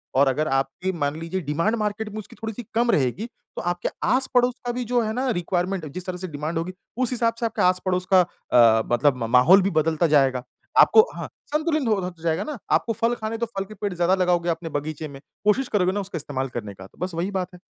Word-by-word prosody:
और 140 +1 +5
अगर 150 +4 +1
आपकी 135 +7 -1
मान 145 +1 0
लीजिए 165 +3 -3
डिमांड 165 +9 0
मार्केट 210 0 -2
में 215 - -8
उसकी 210 - -11
थोड़ी-सी 225 +1 -5
कम 235 +1 +3
रहेगी 140 - +1 0.3
तो - - -4
आपके 175 0 -1 0.2
आस-पड़ोस 250 -1 +2
का 240 - 0
भी 250 - -2
जो 245 -1 +3
है 215 - -2
ना 255 +3 -1
रिक्वायरमेंट 180 +1 -1
है 150 - -7
जिस 180 +4 -7
तरह 180 -1 -4
से 185 - -5
डिमांड 155 +1 -4
होगी, 170 +3 -3 0.2
उस 255 -1 +1
हिसाब 230 -2 +1
से 235 - -1
आपके 225 - -2
आस-पड़ोस 180 0 +1
का 185 - +8
अ, 115 -10 +3
मतलब 130 +2 +3
म - - -1
माहौल 165 +11 +7
भी 190 - +1
बदलता 160 +1 +2
जाएगा। 135 -4 +3 0.4
आपको 440 - +8
हाँ, - - -5 0.2
संतुलित 305 -3 0
हो 215 - +3
होता 175 -2 -7
जाएगा 165 +3 0
ना? 300 +2 -5
आपको 230 - +2
फ़ल 230 +2 +1
खाने 220 -1 -4
हैं - - -6
तो 235 - 0
फल 195 - -1
के 215 - -11
पेड़ 205 -1 -3
ज़्यादा 175 +2 +2
लगाओगे 175 -2 +1
अपने 165 0 -2
बगीचे 155 +1 -4
में, 140 -2 -11 0.3
कोशिश 245 +5 +3
करोगे 185 -3 +2
ना 205 - -1
उसका 195 -3 -5
इस्तेमाल 135 -3 -3
करने 105 -3 -5
का 95 0 -12
तो - - -28
बस 180 0 -2
वही 180 +4 -2
बात 185 -2 -3
है। 180 - -12
180 Hz, 245 wpm, -24 LUFS, 155-215 Hz, 0.4 s, का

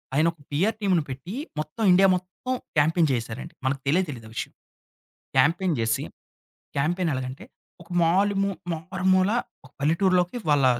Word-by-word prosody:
ఆయన 155 +3 +4
ఒక 165 - -34
పిఆర్ 200 +10 +1
టీమ్‌ని 185 -5 +2
పెట్టి 135 - -6 0.2
మొత్తం 155 +9 -4
ఇండియా 190 +2 +6
మొత్తం 185 +8 -4 0.2
క్యాంపింగ్ 160 +2 +3
జేసేసారండి. 120 +5 -4
మనకు 135 0 0
తెలే 165 +7 +4
తెలియదు 115 -6 -7
ఆ - - -13
విషయం. - - -4 0.8
క్యాంపెయిన్ 170 +2 +3
జేసి 115 -1 +1 0.7
క్యాంపెయిన్ 170 +5 +1
ఎలాగంటే, 130 +1 -5 0.4
ఒక 165 - -16
మాలుమూ 195 +3 +2 0.2
మారుమూల 185 +3 +1 0.3
ఒక 130 - -16
పల్లెటూరులోకి 180 - +2
వాళ్ళ 145 -3 +4
165 Hz, 140 wpm, -25 LUFS, 140-185 Hz, 0.8 s, ఇండియా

